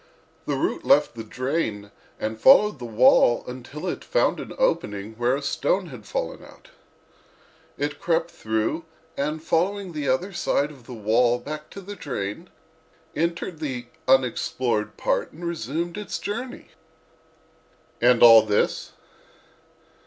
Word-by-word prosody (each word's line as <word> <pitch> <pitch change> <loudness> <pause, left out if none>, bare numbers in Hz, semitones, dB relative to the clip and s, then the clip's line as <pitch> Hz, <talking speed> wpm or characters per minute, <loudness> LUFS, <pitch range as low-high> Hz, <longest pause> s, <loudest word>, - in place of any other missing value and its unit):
The - - 0
root - - -1
left - - +4
the 115 -1 -7
drain 110 -4 -3 0.3
and 110 +1 -4
followed 210 - +6
the 120 - -6
wall 120 +1 +4
until 130 +6 -8
it 180 - -3
found - - +1
an - - -7
opening 110 - -1
where 120 +3 +1
a 140 - -5
stone 180 +5 0
had 115 -7 -11
fallen - - -4
out. - - -16 1.1
It 145 +1 -3
crept 170 0 0
through 110 +7 -2 0.3
and 150 +3 -2
following 190 +4 0
the 145 -3 -2
other 180 +10 0
side 150 -3 0
of 130 -5 -16
the 125 - -7
wall 115 +3 +2
back 150 +4 -7
to 200 - -9
the 205 +2 -8
drain, 105 - -5 0.7
entered 170 +1 -2
the 125 -6 -4 0.2
unexplored 125 -3 +1
part - - -1
and 175 - -8
resumed 170 - -3
its 210 - -4
journey." 240 +5 -6 1.3
"And 120 0 +5
all 115 -1 +10
this?" 105 -1 0
140 Hz, 140 wpm, -24 LUFS, 120-170 Hz, 1.3 s, all